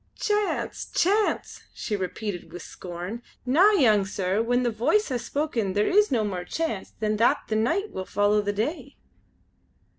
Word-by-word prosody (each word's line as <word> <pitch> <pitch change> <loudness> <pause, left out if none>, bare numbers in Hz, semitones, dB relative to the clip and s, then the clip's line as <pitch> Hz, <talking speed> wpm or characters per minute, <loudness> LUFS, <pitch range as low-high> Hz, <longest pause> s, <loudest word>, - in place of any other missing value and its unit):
"Chance! 415 -1 -1
chance!" 410 +4 +1
she 215 - -3
repeated 195 0 -4
with 175 - -8
scorn. 180 +6 -7 0.2
"Na! 320 +11 +5
young 220 - +4
sir; 195 +1 -1
when 245 +2 +1
the 240 - +1
Voice 275 - +1
has 245 -3 -2
spoken 245 -11 -1
there 205 +1 +2
is 420 +2 +4
no 235 -4 +2
more 190 -4 -3
chance 225 - -3
than 215 0 -2
that 230 +3 +3
the 215 - 0
nicht 330 - 0
will 185 - -5
follow 205 +2 +2
the 205 0 -1
day." 230 - -3
220 Hz, 160 wpm, -26 LUFS, 205-300 Hz, 0.2 s, Na